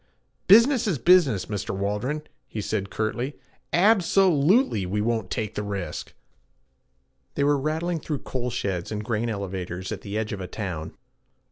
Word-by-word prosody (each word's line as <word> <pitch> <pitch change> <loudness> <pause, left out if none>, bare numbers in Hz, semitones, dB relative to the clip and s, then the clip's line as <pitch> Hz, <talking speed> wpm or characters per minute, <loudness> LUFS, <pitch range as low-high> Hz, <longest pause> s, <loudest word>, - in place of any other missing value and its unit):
'Business 235 +4 +6
is 180 -7 +1
business, 140 - +4
Mr. 100 -2 -3
Waldron,' 105 +10 -2 0.2
he 110 - -6
said 100 -1 -2
curtly. 120 +7 -2 0.4
'Ab 200 +4 +5
so 185 +1 +4
lute 185 - +4
ly, 100 -3 -1
we 105 +3 -1
won't 115 0 -1
take 110 -4 -3
the - - -3
risk.' 100 -3 -5 1.2
They 140 - +1
were 145 +1 +4
rattling 160 +4 -1
through 150 -2 -4
coal 125 -1 -2
sheds 95 -6 -3
and 105 -1 -4
grain 115 0 -1
elevators 95 -3 -4
at - - -4
the 100 +1 -4
edge 110 -1 -2
of 100 - -5
a 90 - -5
town. 90 -8 -5
110 Hz, 165 wpm, -25 LUFS, 100-155 Hz, 1.2 s, Business